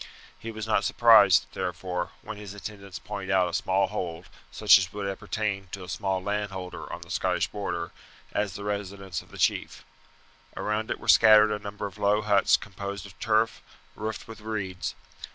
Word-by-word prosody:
He 115 - -7
was 110 -1 -5
not 110 -2 +2
surprised, 110 -6 +6
therefore, 90 -1 -3
when 110 - -6
his 105 -1 -9
attendants 100 -2 -8
pointed 100 -2 -6
out 95 -2 +3
a - - -9
small 95 +3 +2
hold, 90 -3 -5 0.2
such - - +6
as 90 -2 -3
would 100 -1 -4
appertain 100 0 -3
to 100 - -5
a 90 - -10
small 95 -2 -2
landowner 100 -3 -4
on - - -6
the - - -13
Scottish - - +1
Border, 85 -5 -4 0.4
as 105 -3 -1
the 100 - -6
residence 100 -3 -4
of - - -20
the - - -12
chief. - - 0 0.7
Around 105 +1 -1
it - - -2
were - - -11
scattered 110 -1 +7
a 105 - -1
number 105 0 -6
of 100 +1 -8
low 105 +1 +2
huts 100 -2 +4
composed 100 0 -7
of 95 - -14
turf, 110 0 +1 0.3
roofed 110 0 -5
with 115 -1 -10
reeds. 105 -4 -4
100 Hz, 180 wpm, -27 LUFS, 95-105 Hz, 0.7 s, scattered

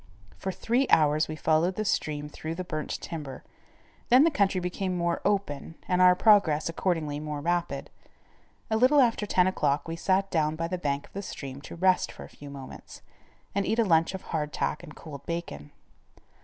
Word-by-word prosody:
For 190 - -4
three 245 +7 0
hours 155 0 +4
we 155 - -5
followed 160 +4 +1
the 215 - -2
stream 150 -6 -1
through 155 +2 -6
the 185 - -4
burnt 155 -3 -4
timber, 150 -5 -7 0.7
then 250 +3 +7
the 330 - +4
country 200 -7 +2
became 180 +1 -2
more 170 -1 0
open 190 -7 -1
and 180 0 +2
our 180 0 +7
progress, 180 -7 +4
accordingly, 165 -4 -1
more 150 -1 -4
rapid. 175 +3 -2 0.8
A 220 - +3
little 260 +5 +5
after 230 -5 +2
ten 180 -2 +3
o'clock 150 -6 0
we 165 - -3
sat 195 +3 +1
down 155 -2 +1
by 165 +1 -2
the 180 +1 -3
bank 140 -3 -2
of - - -23
the 200 - -4
stream 140 -7 -7
to - - -9
rest 185 +1 +2
for - - -10
a - - -11
few 145 - -12
moments, 140 -2 -10 0.5
and 200 - +1
eat 220 +3 0
a 230 - +3
lunch 165 0 +3
of 190 - -7
hard 150 -2 -3
tack - - -2
and 150 - -12
cold 145 -4 -10
bacon. 170 - -5
170 Hz, 195 wpm, -27 LUFS, 150-190 Hz, 0.8 s, then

